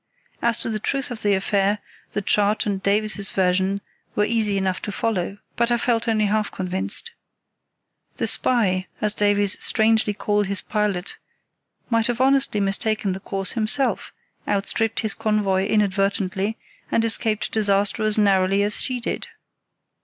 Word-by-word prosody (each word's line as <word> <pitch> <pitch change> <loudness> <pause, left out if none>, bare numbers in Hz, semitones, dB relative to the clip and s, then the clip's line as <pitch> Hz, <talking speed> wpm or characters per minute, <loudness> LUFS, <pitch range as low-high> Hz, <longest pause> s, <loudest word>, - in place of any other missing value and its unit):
As 235 -1 +2
to - - 0
the 215 - -2
truth 275 +4 -1
of 225 -3 -5
the 205 -1 +2
affair, 195 +1 +1 0.4
the 205 - -2
chart 205 +2 +2
and 200 -2 -2
Davies's 205 0 0
version 190 +1 +1 0.3
were 210 - +2
easy 215 -3 +1
enough 190 -1 -1
to 210 - -4
follow, 200 -2 -2 0.2
but 235 0 +1
I 240 - +3
felt 235 -1 0
only 215 -2 +2
half 210 0 0
convinced. 190 - -3 1.1
The - - 0
"spy", 190 -7 +1
as 210 -1 +1
Davies 205 -1 +2
strangely 220 -1 +2
called 205 0 0
his 200 0 -1
pilot, 205 -4 -2 0.7
might 230 -1 +3
have 240 -1 -2
honestly 265 -4 +3
mistaken 200 0 +1
the 190 - -5
course 195 0 -2
himself, 235 +5 0 0.4
outstripped 210 +2 0
his 220 -1 -1
convoy 200 -3 0
inadvertently, 200 0 0 0.3
and 230 - +2
escaped 220 -1 0
disaster 205 0 +2
as 215 0 +1
narrowly 195 -1 +3
as 210 +1 0
she 255 -2 -2
did. 235 - -4
210 Hz, 150 wpm, -22 LUFS, 195-220 Hz, 1.1 s, I